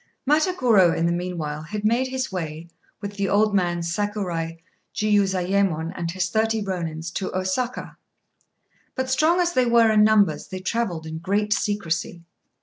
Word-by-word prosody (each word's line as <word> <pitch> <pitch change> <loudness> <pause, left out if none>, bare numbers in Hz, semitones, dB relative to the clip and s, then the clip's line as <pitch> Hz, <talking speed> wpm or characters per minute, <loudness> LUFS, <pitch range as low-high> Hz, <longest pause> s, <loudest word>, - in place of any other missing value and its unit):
Matagorô 255 - +3
in 165 - +1
the 170 - +2
meanwhile 170 -4 -3
had 205 +7 -5
made 240 +4 +2
his 260 -2 -3
way, 165 -3 -5 0.3
with 200 0 -6
the 200 -1 0
old 210 +1 +3
man 175 -3 +1
Sakurai 170 -3 -2 0.4
Jiuzayémon 195 -5 +1
and 170 -1 -3
his 180 0 -1
thirty 220 +1 +1
Rônins, 170 -4 -4
to 190 - -3
Osaka. 190 +7 -3 1.0
But, 260 0 -2
strong 315 +7 +3
as 350 -1 +1
they 255 -4 +2
were 235 -1 +5
in 210 -1 +5
numbers, 215 -2 +3
they 185 - -6
travelled 185 -4 -2
in 160 0 -6
great 205 +4 0
secrecy. 175 -4 -2
195 Hz, 150 wpm, -23 LUFS, 170-220 Hz, 1.0 s, were